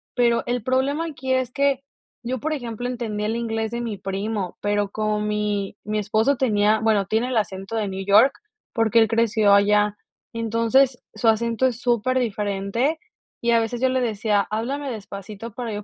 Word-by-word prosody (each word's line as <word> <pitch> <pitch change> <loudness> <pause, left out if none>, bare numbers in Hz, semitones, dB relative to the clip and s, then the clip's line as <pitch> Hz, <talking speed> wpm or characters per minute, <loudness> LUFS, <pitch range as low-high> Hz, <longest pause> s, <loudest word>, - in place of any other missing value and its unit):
Pero, 235 -2 +3
el 245 -2 -2
problema 270 +6 0
aquí 265 -4 -3
es 260 -1 0
que, 275 0 +1 0.4
yo, 250 +2 -3
por 310 +6 -2
ejemplo, 245 -3 -4
entendía 225 -4 -3
el 220 +2 -1
inglés 225 -1 -2
de 235 0 -3
mi 225 -4 -4
primo, 195 0 -3
pero, 205 0 0
como 215 0 -1
mi 210 -2 -1
mi 215 +1 -2
esposo 215 +6 +2
tenía 215 -3 +2
Bueno, 215 -3 +2
tiene 225 +4 0
el 250 - 0
acento 195 0 -3
de 215 -2 0
New 190 0 -5
York, 210 +7 +6 0.4
porque 225 -1 +3
él 225 - +5
creció 220 -2 +3
allá. 210 0 +3 0.4
Entonces, 230 +3 +2
su 235 - -1
acento 230 +2 +2
es 245 -2 -1
súper 245 +1 +1
diferente, 210 +6 -1 0.4
y 235 - +1
a 230 - +5
veces 230 +2 -3
yo 260 - +3
le 260 0 +1
decía: 210 -3 0
"Háblame 265 +6 -2
despacito, 210 +1 -8
para 230 0 -5
yo 205 0 -5
225 Hz, 180 wpm, -23 LUFS, 210-245 Hz, 0.4 s, York